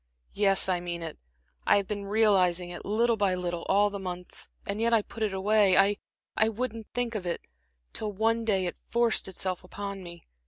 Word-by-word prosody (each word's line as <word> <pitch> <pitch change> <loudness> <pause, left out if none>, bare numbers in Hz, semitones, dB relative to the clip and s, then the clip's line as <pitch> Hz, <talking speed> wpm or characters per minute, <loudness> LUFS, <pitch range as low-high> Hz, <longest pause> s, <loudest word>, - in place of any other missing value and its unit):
"Yes, 195 -2 +4
I 185 -2 +1
mean 175 -1 -5
it. 160 - -7 0.4
I - - +5
have 200 -1 -1
been 205 -1 -4
realizing 190 -4 +3
it, 175 - -8
little 230 +2 +2
by 200 -3 +2
little, 175 -1 -3
all 205 +1 +4
these 200 -1 -5
months. 180 -1 -6 0.2
And 200 +2 -3
yet 235 0 +2
I 220 -2 +4
put 225 - -11
it 215 -2 +1
away 200 0 +3 0.6
I 220 - +4
wouldn't 225 -1 -4
think 245 -1 -2
of 195 -5 -4
it 170 - -2 0.5
till 215 -1 -3
one 225 +3 +1
day 195 -4 +1
it 175 - -4
forced 235 -1 +2
itself 185 -1 -3
upon 200 +1 -6
me. 170 -1 -11
200 Hz, 195 wpm, -28 LUFS, 180-220 Hz, 0.6 s, I